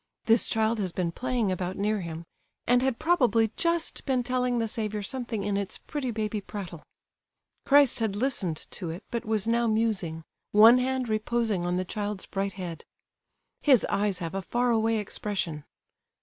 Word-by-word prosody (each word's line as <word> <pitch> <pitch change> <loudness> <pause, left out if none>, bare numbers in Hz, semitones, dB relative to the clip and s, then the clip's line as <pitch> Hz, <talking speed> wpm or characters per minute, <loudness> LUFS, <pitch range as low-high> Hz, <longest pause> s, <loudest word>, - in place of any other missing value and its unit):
This 225 0 +5
child 220 0 +1
has 190 -3 -1
been 170 -1 -1
playing 245 -1 -1
about 185 0 -3
near 210 0 0
Him, 165 -1 -6 0.4
and 245 +1 +4
had 260 -2 0
probably 240 - +3
just 335 -1 0
been 260 -3 0
telling 250 0 0
the 225 -1 0
Saviour 215 -1 -3
something 235 -2 -3
in 205 0 0
its 200 -1 -3
pretty 285 -4 -4
baby 215 -2 -2
prattle. 185 -6 -7 0.9
Christ 280 -3 +5
had 220 -3 0
listened 205 - -1
to 175 -4 -5
it, 170 +5 -6
but 235 - -3
was 220 -2 +1
now 235 +1 +2
musing—one 215 +1 +3
hand 260 0 -1
reposing 215 -4 0
on 180 0 0
the 185 - -1
child's 205 0 -4
bright 195 0 -3
head. 175 -4 -6 0.8
His 265 -6 +5
eyes 200 -1 +1
have 165 -1 -5
a 195 - -2
far 240 +6 0
away 225 0 +2
expression. 195 -7 -3
215 Hz, 165 wpm, -27 LUFS, 190-240 Hz, 0.9 s, This